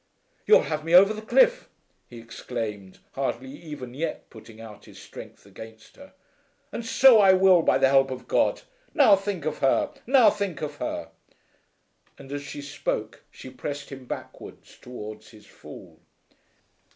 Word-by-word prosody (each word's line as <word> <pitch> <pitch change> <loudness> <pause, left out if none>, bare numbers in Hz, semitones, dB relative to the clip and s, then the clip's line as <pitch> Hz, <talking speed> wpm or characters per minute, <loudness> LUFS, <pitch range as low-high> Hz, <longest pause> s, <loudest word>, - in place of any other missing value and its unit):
"You'll 435 - +6
have 155 -1 -4
me 165 +2 +2
over 195 +4 +7
the 215 - -8
cliff," - - +2 0.4
he 120 - -12
exclaimed 115 -4 -7
hardly 130 -1 -4
even 145 -4 -10
yet 160 +5 -5
putting 110 0 -14
out 110 -2 -12
his - - -15
strength - - -13
against 110 +3 -14
her. 280 0 -16 0.6
"And 235 - -6
so 240 0 +5
I 195 -2 +6
will, 185 -2 +5
by - - +2
the 135 - +3
help 135 0 +3
of 130 -1 -8
God. - - 0 0.3
Now 240 -9 +6
think 195 -5 -5
of 155 -1 -3
her! 135 - +1 0.2
Now 260 -3 +5
think 195 -8 -5
of 145 -1 -6
her!" - - -5 1.1
And 135 0 -13
as 145 0 -4
she 145 0 -9
spoke 140 - -5
she 130 - -12
pressed 145 +3 -7
him 135 -2 -10
backwards - - -10
towards 110 -4 -10
his 110 -2 -17
fall. - - -14
145 Hz, 160 wpm, -25 LUFS, 125-195 Hz, 1.1 s, over